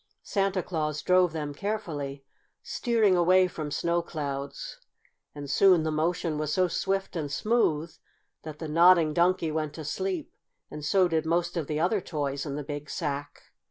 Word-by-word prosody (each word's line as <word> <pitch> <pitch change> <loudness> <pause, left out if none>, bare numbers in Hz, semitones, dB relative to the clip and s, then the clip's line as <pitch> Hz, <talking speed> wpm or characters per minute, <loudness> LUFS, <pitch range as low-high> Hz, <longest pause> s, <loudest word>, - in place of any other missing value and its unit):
Santa 195 -2 0
Claus 155 -3 -2
drove 180 -1 +4
them 150 -2 -4
carefully, 145 -8 -4 0.4
steering 225 -6 +2
away 185 +1 +5
from 155 -4 -5
snow 170 +3 0
clouds, 140 -4 -5 0.6
and 145 -1 -7
soon 180 +3 +5
the 155 - -1
motion 160 0 -1
was 150 -1 -2
so 185 +3 +2
swift 195 +1 -2
and 150 -4 -3
smooth 165 -5 +1 0.5
that 155 -1 -8
the 160 - -6
Nodding 165 0 +5
Donkey 175 -1 +2
went 155 -1 -3
to 155 - -7
sleep, 185 +1 -3 0.4
and 150 0 -7
so 185 +4 +3
did 160 -2 -1
most 175 +1 0
of 165 -5 -2
the 150 0 -2
other 185 +5 +1
toys 140 -3 -3
in 140 - -4
the 150 - -4
big 145 0 -6
sack. 145 -2 -4
160 Hz, 165 wpm, -27 LUFS, 150-185 Hz, 0.6 s, away